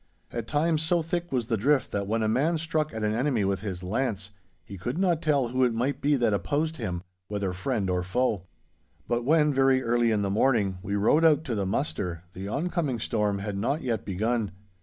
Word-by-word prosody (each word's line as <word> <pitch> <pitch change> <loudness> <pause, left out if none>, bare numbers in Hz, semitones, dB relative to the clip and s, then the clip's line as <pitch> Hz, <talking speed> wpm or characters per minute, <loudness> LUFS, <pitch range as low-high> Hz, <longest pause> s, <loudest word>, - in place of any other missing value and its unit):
At 115 -1 -4
times 155 +1 +1
so 165 +1 +2
thick 175 +1 -3
was 125 -4 0
the 115 -1 0
drift, 135 +6 +2
that 100 -1 -2
when 110 +2 0
a - - +2
man 145 +10 +2
struck 155 -1 -1
at 110 -1 -4
an 105 0 +1
enemy 120 -3 +1
with 95 -1 0
his 95 -3 -5
lance, 100 -1 -2 0.3
he 100 - -9
could 120 - -4
not 175 -4 +2
tell 145 -7 +2
who 130 +1 +1
it 120 -2 +2
might 130 +5 -1
be 145 +1 +3
that 120 -5 +2
opposed 155 +9 -1
him, 90 -7 -4 0.2
whether 100 -3 -2
friend 100 +2 -1
or 90 -1 0
foe. 95 0 -1 0.6
But 120 0 0
when, 150 0 +4
very 135 -1 +3
early 120 0 +2
in 105 -2 +1
the 100 - 0
morning, 105 -4 +2
we 100 +1 -3
rode 115 +11 +3
out 160 -2 +5
to 130 -7 -3
the 100 -3 -1
muster, 90 - -2
the 95 +2 -6
oncoming 150 - -1
storm 105 -2 0
had 100 0 -4
not 140 +9 -1
yet 115 -5 -1
begun. 110 +3 -1
120 Hz, 215 wpm, -27 LUFS, 100-145 Hz, 0.6 s, out